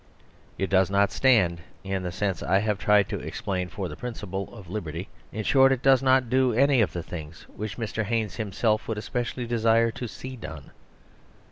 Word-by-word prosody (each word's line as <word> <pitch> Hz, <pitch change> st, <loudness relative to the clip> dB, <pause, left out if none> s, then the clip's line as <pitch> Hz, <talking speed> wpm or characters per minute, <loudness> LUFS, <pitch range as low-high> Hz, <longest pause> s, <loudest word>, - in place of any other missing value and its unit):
It 95 Hz, -, -2 dB
does 95 Hz, -1 st, +4 dB
not 100 Hz, +1 st, +3 dB
stand, 95 Hz, -11 st, +3 dB, 0.2 s
in 95 Hz, -1 st, -2 dB
the 90 Hz, -1 st, -3 dB
sense 95 Hz, +1 st, -2 dB
I 95 Hz, -, +2 dB
have 105 Hz, 0 st, 0 dB
tried 105 Hz, -2 st, +4 dB
to -, -, -3 dB
explain, 90 Hz, -2 st, -3 dB
for 95 Hz, 0 st, -4 dB
the -, -, -7 dB
principle 100 Hz, -6 st, -5 dB
of 105 Hz, -6 st, -12 dB
liberty. 85 Hz, -2 st, -5 dB, 0.2 s
In 110 Hz, -, -4 dB
short, 135 Hz, +3 st, +5 dB
it 135 Hz, -1 st, 0 dB
does 135 Hz, -2 st, +5 dB
not 130 Hz, -1 st, +3 dB
do 130 Hz, 0 st, +2 dB
any 135 Hz, +1 st, +4 dB
of 105 Hz, -, +1 dB
the 85 Hz, -, -4 dB
things 80 Hz, -2 st, -8 dB
which 105 Hz, -1 st, -5 dB
Mr. 115 Hz, -1 st, -2 dB
Haynes 110 Hz, -2 st, -1 dB
him 110 Hz, -4 st, -3 dB
self 110 Hz, +2 st, +1 dB
would 110 Hz, -, -2 dB
especially 120 Hz, +3 st, -3 dB
desire 115 Hz, 0 st, +3 dB
to 125 Hz, -, -6 dB
see 130 Hz, +3 st, -8 dB
done. 75 Hz, -, -9 dB
105 Hz, 200 wpm, -26 LUFS, 95-120 Hz, 0.2 s, short